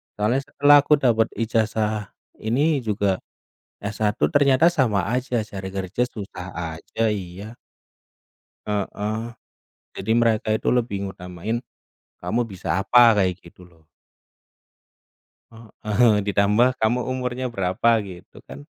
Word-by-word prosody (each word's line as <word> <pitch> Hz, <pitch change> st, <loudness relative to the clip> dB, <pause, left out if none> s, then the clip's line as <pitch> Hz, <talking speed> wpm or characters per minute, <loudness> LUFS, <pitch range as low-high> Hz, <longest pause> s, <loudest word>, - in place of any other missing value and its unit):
Soalnya 110 Hz, +6 st, +1 dB
setelah 145 Hz, 0 st, +5 dB
aku 150 Hz, -, +4 dB
dapat 115 Hz, -3 st, +3 dB
ijazah 110 Hz, -2 st, -1 dB, 0.3 s
ini 140 Hz, +8 st, +1 dB
juga, 100 Hz, -2 st, +1 dB, 0.7 s
S1, 105 Hz, +1 st, 0 dB
Ternyata 145 Hz, +2 st, +4 dB
sama 125 Hz, -, +1 dB
aja 125 Hz, -1 st, -1 dB
cari 95 Hz, -3 st, -7 dB
kerja 95 Hz, +4 st, -2 dB
susah 100 Hz, -6 st, -8 dB, 0.3 s
aja, 115 Hz, -, -5 dB
iya. 100 Hz, +3 st, -6 dB, 1.1 s
Heeh. 105 Hz, +2 st, -3 dB, 0.7 s
Jadi 110 Hz, -, -2 dB
mereka 115 Hz, -2 st, +1 dB
itu 110 Hz, +1 st, -1 dB
lebih 115 Hz, -5 st, -1 dB
ngutamain, 95 Hz, +5 st, -5 dB, 0.6 s
kamu 120 Hz, +2 st, -1 dB
bisa 95 Hz, -3 st, -3 dB
apa, 115 Hz, +2 st, +6 dB
kayak 95 Hz, -2 st, +1 dB
gitu 85 Hz, +1 st, -16 dB
loh. 80 Hz, -3 st, -23 dB, 2.0 s
Heeh, 110 Hz, +1 st, +4 dB
ditambah 105 Hz, +4 st, +3 dB
kamu 110 Hz, +3 st, +2 dB
umurnya 130 Hz, 0 st, -3 dB
berapa 95 Hz, +2 st, +1 dB
gitu 95 Hz, -3 st, -12 dB
kan. 70 Hz, +2 st, -10 dB
110 Hz, 110 wpm, -23 LUFS, 100-120 Hz, 2.0 s, apa